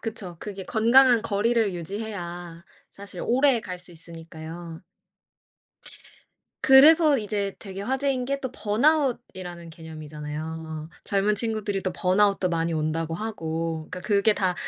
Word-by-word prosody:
그쵸. 210 -6 -6
그게 195 -1 -7
건강한 240 +1 +5
거리를 225 -1 +1
유지해야 175 -2 -6 0.3
사실 200 0 -10
오래갈 240 -7 +2
수 180 - -8
있으니까요. 165 0 -9 1.8
그래서 300 +2 +7
이제 205 -2 -2
되게 195 -2 -8
화제인 265 +3 -1
게 270 - -3
또 260 - -4
번아웃이라는 220 - 0
개념이잖아요. 155 0 -7 0.2
젊은 205 0 +1
친구들이 210 -3 -2
또 185 - -2
번아웃도 195 +1 +2
많이 165 -1 -1
온다고 160 +1 -1
하고. 165 -5 -3
그러니까 185 - -6
그게 205 +3 +3
다 185 -3 0
195 Hz, 305 characters per minute, -25 LUFS, 165-225 Hz, 1.8 s, 그래서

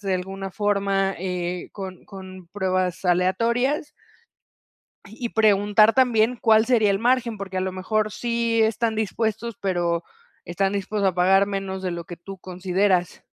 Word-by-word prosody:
de 195 -2 -1
alguna 195 +1 -5
forma, 200 -1 0
eh, 180 -1 -3
con 190 -2 -8
con 185 -2 -11
pruebas 185 -2 -1
aleatorias. 235 - +1 1.1
Y 225 +4 -6
y - - -4
preguntar 215 0 +4
también, 245 -2 +3
cuál 220 -1 +4
sería 225 -5 +3
el 195 - +1
margen. 235 0 +1
Porque 190 -1 -6
a - - +1
lo 185 0 -2
mejor, 215 +3 -1
sí 235 -1 0
están 220 +1 +1
dispuestos, 220 +1 -2
pero, 175 -3 0 0.4
están 195 +3 -1
dispuestos 200 0 0
a - - -15
pagar 190 +2 +4
menos, 195 -1 -4
de 185 - -2
lo 170 -1 -5
que 175 - -9
tú 195 +3 -10
consideras, 185 0 -1
195 Hz, 155 wpm, -23 LUFS, 185-220 Hz, 1.1 s, preguntar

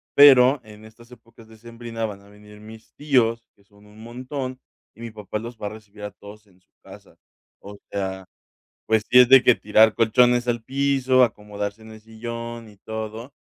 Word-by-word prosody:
pero 135 -1 +7
en 105 0 -15
estas 115 +2 -18
épocas 115 -1 -18
decembrinas 115 0 -8
van 100 -1 -9
a 100 - -20
venir 105 0 -17
mis 110 +1 -15
tíos 120 -6 0
que 100 - -29
son 100 +1 -24
un 105 +1 -18
montón 130 +2 -7 0.4
y - - -22
mi 115 -1 -7
papá 105 0 -6
los 115 +1 -9
va 105 - -5
a - - -4
recibir 105 -1 -14
a 105 - -6
todos 105 +1 -15
en 95 -1 -27
su - - -43
casa, - - -16 0.5
o 100 0 -11
sea, 95 -1 -4 0.6
pues 110 -1 +1
si 125 - +6
es 125 - +7
de 135 -1 +7
que 125 - +6
tirar 110 +1 +3
colchones 120 +2 +3
al 120 -2 -2
piso, 135 -1 +1
acomodarse 105 0 -7
en 110 0 -13
el 110 - -12
sillón 115 0 -8
y 105 - -19
todo, 110 +5 -8
110 Hz, 190 wpm, -22 LUFS, 105-120 Hz, 0.6 s, pero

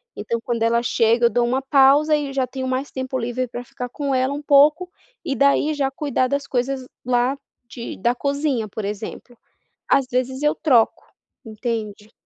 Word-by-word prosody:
Então 235 - -3
quando 235 -1 -2
ela 235 +1 +2
chega, 235 0 +2
eu - - +5
dou 240 0 +1
uma 255 +3 0
pausa 280 +3 +4
e 285 -2 -3
já 265 -1 +1
tenho 260 +1 -5
mais 260 +2 -2
tempo 260 0 -4
livre 245 +1 -2
pra 245 +1 -7
ficar 245 0 -7
com 280 +2 -3
ela 260 +2 +1
um 290 - -5
pouco, 300 +5 +4 0.3
e 275 - -2
daí 280 +4 +3
já 275 -2 0
cuidar 270 -2 -1
das 280 +2 -2
coisas 260 +1 -2 0.2
lá 250 +2 +1 0.3
de 235 - -7
da 235 +5 +1
cozinha, 280 -4 -1
por 215 +1 -6
exemplo. 215 +4 -6 0.5
Às 275 -2 +3
vezes 255 +2 -1
eu 300 0 +2
troco, 245 -8 +2 0.4
entende? 220 -2 -5
255 Hz, 180 wpm, -21 LUFS, 235-280 Hz, 0.5 s, eu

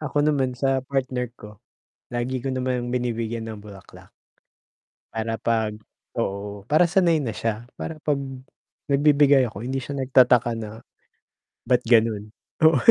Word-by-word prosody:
Ako 145 -1 0
naman 135 -4 +1
sa 135 0 +1
partner 130 -2 -1
ko, 105 -1 -13 0.5
lagi 120 +2 -1
ko 135 - -1
naman 125 -1 -2
binibigyan 115 -2 -2
ng 110 - -6
bulaklak, 100 -3 -14 1.0
para 115 0 -2
'pag 110 -2 0 0.4
oo, 100 +1 -3
para 155 +4 +6
sanay 170 -3 +3
na 120 -7 -3
siya. 115 +1 -2
Para 160 - -6
'pag 150 -1 +1 0.7
nagbibigay 140 -1 +5
ako, 100 - -9
hindi 135 +1 -2
siya 140 -1 -5
nagtataka 125 -3 +4
na, 110 0 -7 0.9
ba't 125 -1 +3
gano'n? 110 -3 +3 0.4
Oo. 160 -2 +6
125 Hz, 135 wpm, -24 LUFS, 110-135 Hz, 1.0 s, para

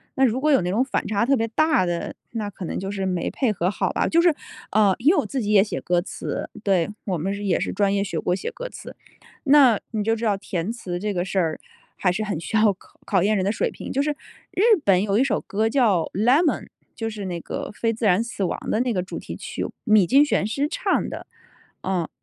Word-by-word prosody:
那 265 - +2
如 250 0 +3
果 305 +2 +2
有 270 - +5
那 175 - -2
种 225 +7 +2
反 - - -2
差 210 +2 +1
特 275 +1 +3
别 225 -1 0
大 310 - +2
的， 170 -1 -3 0.2
那 215 -3 -2
可 190 - -7
能 - - -4
就 195 +1 -4
是 195 -1 -3
没 180 -2 -1
配 250 -6 0
合 180 -3 -1
好 - - -1
吧。 - - 0
就 335 +1 +4
是， 350 - +5 0.4
啊， 205 -2 +4
因 285 +7 +5
为 380 - +2
我 - - -1
自 265 -3 -3
己 210 - -3
也 200 -2 +6
写 210 - -4
歌 175 0 +1
词， 190 - -5 0.2
对， 190 -4 +2 0.2
我 185 -4 -1
们 190 +6 -2
是 205 +1 -5
也 190 -4 +1
是 - - -2
专 200 -1 +1
业 200 - +1
学 170 -5 -3
过 180 - 0
写 - - -4
歌 - - -7
词， - - -10 0.5
那 270 -6 +6
你 215 -2 -1
就 225 +1 +2
知 230 - -7
道 205 -3 +2
填 185 +1 -3
词 180 -7 -5
这 210 +1 -2
个 175 +1 0
事 195 0 -1
儿 160 -3 -1 0.4
还 180 - +2
是 215 +4 -2
很 200 -7 -3
需 220 - -5
要 215 -1 +5 0.3
考 190 -3 +2
验 215 +1 +2
人 190 - +1
的 200 - +1
水 - - -1
平， - - -8
就 275 +2 +1
是 300 - 0 0.4
日 375 - -1 0.2
本 190 -2 +4
有 205 0 +1
一 255 - +4
首 275 - 0
歌 215 +3 -1
叫 225 -8 +3
《Lemon》， 260 - +3 0.3
就 225 -1 -3
是 210 -3 -6
那 175 -2 -4
个 - - -5
《非 230 -1 0
自 230 0 -3
然 195 +3 +4
死 230 -4 -4
亡》 175 - -1
的 220 - +1
那 250 -2 0
个 180 - 0
主 185 - -6
题 - - -7
曲， - - -5 0.2
米 215 -5 +5
津 275 +9 +5
玄 290 - +1
师 275 +7 -1
唱 - - 0
的。 - - -7 0.6
哦， 185 -3 -1
210 Hz, 285 characters per minute, -23 LUFS, 190-240 Hz, 0.6 s, 也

